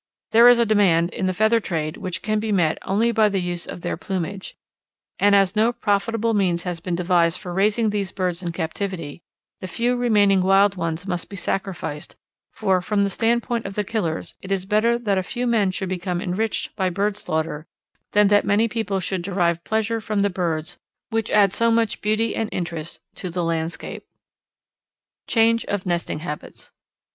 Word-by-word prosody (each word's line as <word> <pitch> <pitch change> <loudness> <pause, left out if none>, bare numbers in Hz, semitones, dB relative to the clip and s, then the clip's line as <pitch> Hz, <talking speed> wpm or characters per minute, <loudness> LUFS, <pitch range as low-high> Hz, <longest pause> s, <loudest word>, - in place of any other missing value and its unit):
There 230 +2 +7
is 245 0 +8
a 235 - +3
demand 185 -6 +3
in 185 - -2
the - - +1
feather 220 +4 +3
trade 155 -7 -3
which 180 -4 -5
can 215 0 0
be 220 0 -2
met 170 -6 +2
only 220 +5 +1
by 220 -2 +3
the 195 -1 0
use 175 -1 -3
of - - -7
their 175 - -3
plumage, 190 +1 -5 0.6
and 205 0 +5
as 195 0 +3
no 220 +3 +3
profitable 225 0 0
means 180 -4 +1
has 180 -2 -4
been 175 0 -3
devised 170 -1 +2
for 180 -3 -7
raising 210 +3 +2
these 200 -2 -2
birds 180 -2 -2
in 175 -2 -3
captivity 165 -1 -4 0.4
the 185 - -6
few 240 +5 0
remaining 205 -5 +3
wild 195 +2 +4
ones 165 0 -3
must 175 -3 -3
be 200 - -8
sacrificed, 185 -5 -4 0.4
for 190 -4 +1
from 200 +2 +1
the 200 - 0
standpoint 235 +2 0
of 195 - -8
the 210 - 0
killers 185 -7 -3
it 195 - -8
is 190 -1 0
better 215 +4 +2
that 205 -5 0
a - - 0
few 245 +6 -4
men 225 -5 +2
should 185 0 -4
become 180 -1 -2
enriched 205 +4 -2
by 190 -3 0
bird 200 +3 -1
slaughter 160 -4 -3 0.5
than 210 0 +5
that 205 0 +4
many 210 +3 +2
people 215 -4 -2
should 185 0 -3
derive 170 -2 0
pleasure 220 +1 -1
from 215 -2 -1
the 200 0 +1
birds 175 -2 -3 0.3
which 225 -1 -1
add 200 -2 +4
so 230 0 +2
much 230 -1 +1
beauty 215 +2 0
and 220 -1 -2
interest 170 -2 -4
to 185 - -6
the 175 +1 -2
landscape. 165 0 -3 1.2
_Change 230 0 +3
of 205 -1 -3
Nesting 170 -3 -2
Habits. 150 -3 -8
195 Hz, 190 wpm, -22 LUFS, 175-215 Hz, 1.2 s, is